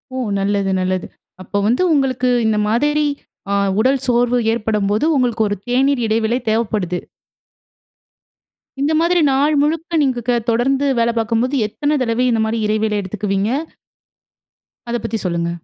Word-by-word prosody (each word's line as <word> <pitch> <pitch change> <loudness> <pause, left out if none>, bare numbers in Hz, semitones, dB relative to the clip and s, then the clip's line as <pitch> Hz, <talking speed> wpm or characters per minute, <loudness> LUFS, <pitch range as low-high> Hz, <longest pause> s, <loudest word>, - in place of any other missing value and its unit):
ஓ! - - -3 0.2
நல்லது, 200 0 0
நல்லது. 185 0 -1 0.3
அப்போ 195 +2 -4
வந்து 235 +8 +2
உங்களுக்கு 260 -3 +1 0.2
இந்த 220 -1 +1
மாதிரி 295 +7 +1 0.5
ஆ - - +1 0.3
உடல் 260 +3 +2
சோர்வு 245 0 +2
ஏற்படும்போது, 215 0 0
உங்களுக்கு 240 -4 +1
ஒரு 205 - -1
தேநீர் 265 +2 +2
இடைவேளை 220 +2 +1
தேவப்படுது. 210 -5 -1 1.8
இந்த 295 +3 +1
மாதிரி 345 +1 +2
நாள் 285 +3 +2
முழுக்க 325 +3 -1
நீங்க 260 -3 0
க - - +3 0.2
தொடர்ந்து 265 +4 +1
வேல 235 0 +2
பார்க்கும்போது, 230 +4 0
எத்தனை 290 +7 -2
தடவை 235 +1 0
இந்த 225 -1 +1
மாரி 225 +1 -1
இடைவேளை 215 0 0
எடுத்துக்குவீங்க? 200 +1 -2 1.4
அத 240 - 0
பத்தி 230 -1 -2
சொல்லுங்க. 170 -1 -1
230 Hz, 135 wpm, -18 LUFS, 210-265 Hz, 1.8 s, க